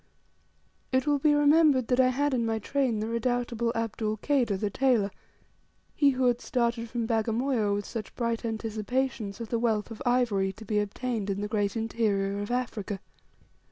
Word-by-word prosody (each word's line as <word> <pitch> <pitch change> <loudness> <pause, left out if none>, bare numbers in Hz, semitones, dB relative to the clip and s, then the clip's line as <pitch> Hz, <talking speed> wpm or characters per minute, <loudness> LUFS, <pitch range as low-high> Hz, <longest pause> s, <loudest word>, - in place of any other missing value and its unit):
It 260 +1 +2
will 290 -1 +2
be 295 +1 +4
remembered 290 -4 +4
I 255 - +5
had 280 +3 +1
in 240 -2 +1
my 225 -1 0
train 240 -1 0
the 215 - -2
redoubtable 235 0 -1
Abdul 220 -1 -2
Kader, 245 -5 +1
the 205 +1 -2
tailor, 240 -6 +2 0.8
he 285 - +4
who 260 -1 +1
had 245 -1 +2
started 235 -2 -1
from 235 0 -2
Bagamoyo 225 -1 +1
with 205 0 -3
such 225 -4 -6
bright 230 -1 -1
anticipations 225 0 -2
of 230 -2 -6
the 235 - 0
wealth 225 -2 0
of 225 - -8
ivory 230 -6 +1
to 220 - -12
be 210 0 +1
obtained 210 0 -2
in 200 0 -1
the 205 - -2
great 205 0 -1
interior 205 -3 0
of 205 - -4
Africa. 225 -5 -2
230 Hz, 170 wpm, -28 LUFS, 210-255 Hz, 0.8 s, I